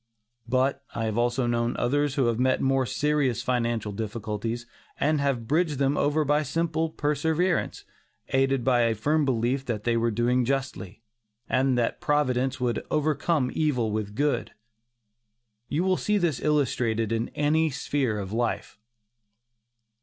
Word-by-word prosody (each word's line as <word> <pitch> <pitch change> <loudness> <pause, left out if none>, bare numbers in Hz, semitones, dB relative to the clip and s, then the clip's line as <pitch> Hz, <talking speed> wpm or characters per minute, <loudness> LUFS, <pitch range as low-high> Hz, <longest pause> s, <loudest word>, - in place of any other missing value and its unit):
But 130 +2 +1
I 115 - -1
have 110 - -1
known 120 0 0
others 145 +3 +1
who 135 - +2
have 115 0 0
met 130 0 +2
more 135 -1 +1
serious 145 -5 0
financial 120 -4 -1
difficulties, 110 +2 -4 0.3
and 150 0 +2
have 130 -5 -1
bridged 155 0 +1
them 140 +1 +1
over 150 +2 +1
by 150 +2 +2
simple 160 +2 -1
perseverance, 160 +4 0 0.4
aided 135 -1 +2
by 125 -1 +3
a 115 -1 +2
firm 150 +7 +1
belief 130 +1 0
that 110 -5 -3
they 120 -1 +1
were 115 0 +2
doing 120 +3 +1
justly, 120 -6 -3 0.4
and 130 0 +2
that 120 +6 -1
Providence 135 -5 +1
would 120 -2 -1
"overcome 155 -2 +1
evil 125 -8 0
with 105 -1 -3
good." 145 +3 0 1.2
You 160 +5 0
will 185 -1 +2
see 210 0 +1
this 170 -9 0
illustrated 120 -7 +1
in 115 +1 -1
any 155 +2 +2
sphere 130 -4 -1
of 100 0 -5
life. 115 -2 -2
130 Hz, 145 wpm, -26 LUFS, 115-150 Hz, 1.2 s, by